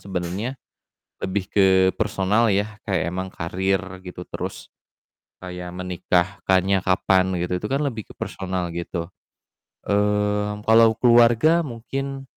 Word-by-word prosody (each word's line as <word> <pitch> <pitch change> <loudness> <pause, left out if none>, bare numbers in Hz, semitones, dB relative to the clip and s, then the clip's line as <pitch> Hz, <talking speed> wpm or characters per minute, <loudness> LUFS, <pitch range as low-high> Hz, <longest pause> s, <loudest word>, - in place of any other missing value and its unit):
sebenernya 95 +6 -4 0.7
lebih 95 0 -2
ke 95 -2 +4
personal 105 +2 +1
ya, 105 +2 -1
kayak 95 -5 0
emang 95 +2 -4
karir, 95 +3 -1 0.2
gitu, 90 -1 -9
terus - - -6 0.7
kayak 90 -1 -7
menikahkannya 90 +1 0
kapan, 95 0 +3
gitu, 90 +1 -1
itu 105 - -3
kan 135 - +1
lebih 115 -6 -3
ke - - -12
personal 95 -2 -3
gitu. 85 0 -4 0.8
Mmm, 105 0 0
kalau 110 0 +5
keluarga 120 +7 +5
mungkin, 135 +2 -5
95 Hz, 115 wpm, -23 LUFS, 90-110 Hz, 0.8 s, kalau